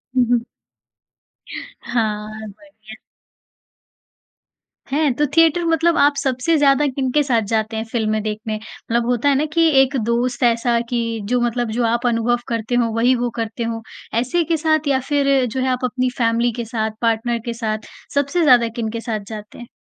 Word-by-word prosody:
हुँ, 250 -1 +4
हुँ। 240 -1 +2 1.4
हाँ, 215 -3 -2 0.2
बढ़िया। 220 -2 -15 1.9
हैं? 290 -1 +2
तो 295 +4 +1
थिएटर 330 +1 +4
मतलब 330 +1 +2
आप 285 0 +4
सबसे 270 +3 0
ज़्यादा 285 0 +4
किनके 270 +2 0
साथ 245 -5 +1
जाते 220 0 0
हैं 220 - -2
फ़िल्में 215 -2 0
देखने? 215 0 -3
मतलब 230 +2 -3
होता 245 +3 +1
है 280 - +3
ना 290 +3 +1
कि 330 0 +4
एक 270 +1 +1
दोस्त 240 +2 0
ऐसा 235 0 +2
कि 245 - 0 0.3
जो 250 0 +2
मतलब 240 -1 -1
जो 240 +2 -1
आप 235 +2 0
अनुभव 240 +1 +1
करते 230 +1 -2
हों 235 -2 +1
वही 245 +3 +3
वो 245 0 -1
करते 225 +1 -3
हों। 230 0 -3 0.4
ऐसे 255 +9 +1
के 330 +1 0
साथ 315 -1 +1
या 270 -2 +2
फिर 275 -2 +3
जो 245 +2 -3
है, 260 - 0
आप 255 0 0
अपनी 255 0 0
फैमिली 235 0 +2
के 235 - -3
साथ, 220 -1 -2
पार्टनर 230 +1 0
के 235 - -2
साथ 220 -2 -4 0.3
सबसे 285 +5 +1
ज़्यादा 250 -5 +5
किनके 230 0 -3
साथ 225 -2 -3
जाते 210 -1 -9
हैं? 240 - -9
240 Hz, 175 wpm, -20 LUFS, 230-275 Hz, 1.9 s, ज़्यादा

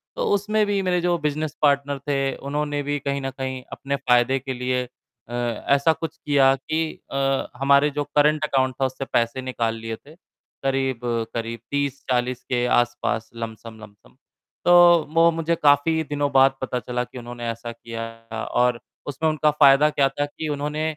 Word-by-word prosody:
तो - - -2
उसमें 210 +1 +1
भी 205 -1 0
मेरे 180 -1 +1
जो 175 0 +1
बिज़नेस 150 -1 -2
पार्टनर 140 -1 +2
थे, 135 -1 0
उन्होंने 145 +1 -3
भी 145 +1 -2
कहीं 140 0 -2
न 135 - -3
कहीं 130 -1 -4
अपने 140 0 -3
फ़ायदे 130 -1 +2
के 130 0 -5
लिए 125 0 -1 0.5
अ, - - -8
ऐसा 120 +6 +1
कुछ 160 0 -6
किया 140 -4 +3
कि 155 +4 -3
अ, 135 0 0
हमारे 140 +2 +4
जो 145 0 -2
करंट 150 +1 +3
अकाउंट 130 -3 0
था, - - +4
उससे 130 +1 -4
पैसे 115 +2 +1
निकाल 120 -3 -2
लिए 115 0 -5
थे, 145 +7 -17 0.5
करीब-करीब 120 -4 -2
30-40 130 -3 -1
के 125 -1 +1
आसपास, 120 -2 -1
लमसम-लमसम। 110 -2 -10 0.5
तो 175 - +5 0.4
वो 165 0 +6
मुझे 165 0 -1
काफ़ी 155 +2 +3
दिनों 145 -1 -2
बाद 135 0 +5
पता 125 -1 -2
चला 125 +2 -3
कि 125 - -12
उन्होंने 120 -1 -7
ऐसा 115 +1 -5
किया, 115 0 -7 0.5
और 125 -1 +3 0.3
उसमें 150 +3 0
उनका 155 0 +2
फ़ायदा 145 0 +6
क्या 140 -2 +2
था 145 +2 -2
कि 155 +2 -6
उन्होंने 150 +2 -3
135 Hz, 165 wpm, -23 LUFS, 125-150 Hz, 0.5 s, वो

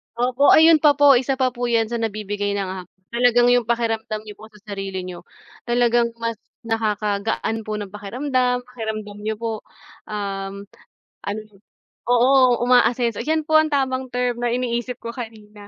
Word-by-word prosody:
Opo, 250 +3 +2
ayun 320 0 +7
pa 290 -1 +5
po, 285 -3 +6
isa 265 +1 -1
pa 255 -1 +1
po 245 0 -3
yun 225 -1 +1
sa 235 - -2
nagbibigay 205 -2 -2
ng 195 -2 -2 0.4
talagang 245 0 +4
yung 245 -2 +3
pakiramdam 225 -2 -1
niyo 210 -1 -10
po 220 - -11
sa 210 - -18
sarili 195 -2 -4
niyo, 180 -1 -8 0.4
talagang 240 -1 +2
mas 230 -1 -3 0.3
nakakagaan 220 0 -1
po 215 - -7
ng 200 -2 -7
pakiramdam, 250 +4 -1
pakiramdam 215 -4 -6
niyo 220 0 -2
po, 230 -1 -2 0.5
um, 200 -1 -5 0.6
ano 205 +2 -3 0.7
oo 250 0 +4
umaasenso 245 -2 +3
yan 315 +1 0
po 310 0 +6
ang 310 - +2
tamang 260 -2 0
term 245 -1 -1
na 240 - 0
iniisip 245 0 -2
ko 230 - -6
kanina. 215 -4 -10
235 Hz, 155 wpm, -22 LUFS, 210-250 Hz, 0.7 s, ayun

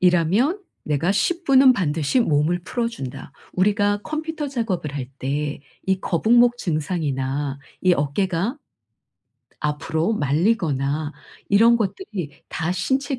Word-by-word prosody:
이라면 185 - +3 0.2
내가 150 +6 +1
10 340 - 0
분은 270 -2 +7
반드시 160 - +1
몸을 160 -3 +2
풀어준다. 230 - -4 0.2
우리가 205 +2 +2
컴퓨터 310 -1 -4
작업을 205 - -2
할 130 -3 -3
때 145 +2 -2 0.3
이 190 -1 +1
거북목 240 +8 +3
증상이나 145 - -2 0.2
이 185 - +5
어깨가 180 - -1 1.0
앞으로 160 +5 -1
말리거나 150 -3 0 0.4
이런 230 +4 +6
것들이 195 - -4
다 170 +1 -2
신체 265 - -1
180 Hz, 245 characters per minute, -22 LUFS, 150-230 Hz, 1.0 s, 분은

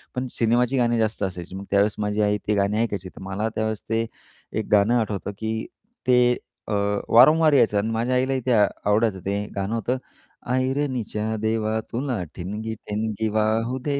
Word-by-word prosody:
पण 125 0 -2
सिनेमाची 120 +3 +2
गाणी 120 -1 +2
जास्त 110 -2 0
असायची. 90 -1 -4
मग 100 - -6
त्यावेळेस 100 +1 +3
माझी 105 0 0
आई 105 0 +2
ती 105 - +2
गाणी 100 +2 +1
ऐकायची 100 -5 -3
तर - - -14
मला 100 +4 -2
त्यावेळेस 110 -1 -2
ते 115 0 +1 0.5
एक - - -3
गाणं 105 +4 +5
आठवतं 105 -2 -2
की 110 0 -2 0.4
ते 125 -1 +6 0.5
अ, 105 - -2 0.4
वारंवार 155 +6 +6
यायचं 110 -6 +4
अन् 110 +3 -1
माझ्या 120 +3 0
आईलाही 130 +1 +1
ते 130 - +1
आवडायचं. 105 0 +2
ते 100 +1 -1
गाणं 100 +3 -1
होतं 115 +3 -1 0.6
ऐरणीच्या 130 -5 -1
देवा 110 0 0
तुला 125 -6 -1
ठिणगी 105 +5 -4
ठिणगी 110 +1 -3
वाहू 110 +4 0
दे. 140 -1 0
110 Hz, 165 wpm, -24 LUFS, 105-120 Hz, 0.6 s, ते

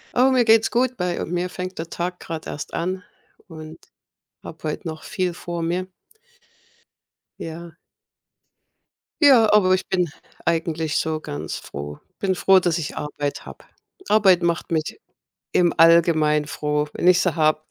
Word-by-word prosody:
Oh, 260 +2 +4
mir 250 -2 +4
geht's 225 -1 +4
gut. 250 +1 +1
Bei 180 -1 -2
mir 180 +2 -2
fängt 185 +1 -6
der 165 +1 -5
Tag 180 +1 -4
grad 160 -1 -7
erst 145 - -7
an 185 +2 -3 0.4
und 160 -2 -10 0.7
habe 160 - -11
heut 150 - -6
noch 160 -1 -6
viel 180 -2 -2
vor 170 -1 -5
mir. 180 +3 -2 1.5
Ja. 165 +1 -7 1.5
Ja, 245 -8 +6
aber 190 -3 +5
ich 185 - 0
bin 180 -3 +1 0.4
eigentlich 160 -2 -1
so 160 -1 -1
ganz 75 - -6
froh. 75 +1 -8 0.2
Bin 190 -2 0
froh, 190 +1 +5
dass 175 -2 0
ich 160 -4 -5
Arbeit 145 -1 -4
habe. - - -12 0.4
Arbeit 190 -5 +4
macht 170 +1 -1
mich 160 - -2 0.6
im 175 -1 +3
Allgemeinen 155 -3 +4
froh, 150 0 -1
wenn - - -1
ich 180 0 +6
sie 180 -3 0
habe. 155 -1 +2
170 Hz, 150 wpm, -22 LUFS, 155-185 Hz, 1.5 s, Ja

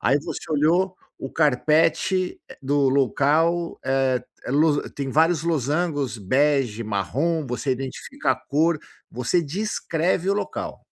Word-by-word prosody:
Aí 140 - +3
você - - -5
olhou 175 +6 +2 0.2
o 135 - -6
carpete 160 +5 +2 0.2
do 140 0 +2
local, 150 +6 +1
eh, 130 -1 +1 0.3
lo 145 +2 +2
tem 140 -1 -5
vários 160 +1 +3
losangos, 145 -3 0
bege, 130 +1 +1
marrom, 140 - -1
você 125 +3 -2
identifica 130 0 -3
a - - -5
cor, 155 +2 +1 0.3
você 125 +9 0
descreve 175 0 -1
o - - +2
local. 210 - -4
145 Hz, 120 wpm, -23 LUFS, 135-165 Hz, 0.3 s, Aí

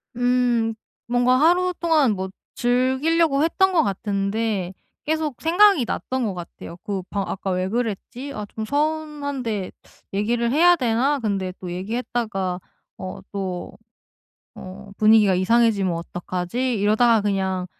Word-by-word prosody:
음 245 -2 +1 0.3
뭔가 245 +1 +3
하루동안 335 -4 +3
뭐 190 -1 -4 0.3
즐기려고 275 +5 +2
했던 380 +4 +2
것 340 - +4
같은데 200 -1 -2 0.3
계속 310 -3 -1
생각이 350 -3 +5
났던 260 +2 -3
것 205 - -2
같아요. 170 -1 -9
그 200 -3 -3
바 200 -1 -1
'아까 195 0 -3
왜 185 0 -1
그랬지? 240 +4 -4
아 210 -3 -5
좀 220 +1 -6
서운한데 285 -7 -2 0.4
얘기를 235 +4 0
해야 345 +5 +5
되나? 260 +2 +1
근데 195 -5 -2
또 180 -2 -6
얘기했다가 195 -1 -3 0.4
어 185 0 -7
또 190 -3 -5 0.8
어 195 +2 -10
분위기가 215 -2 +5
이상해지면 200 0 +2
어떡하지?' 180 +8 -3
이러다가 220 +2 +4
'그냥 190 -2 -1
230 Hz, 270 characters per minute, -22 LUFS, 195-270 Hz, 0.8 s, 생각이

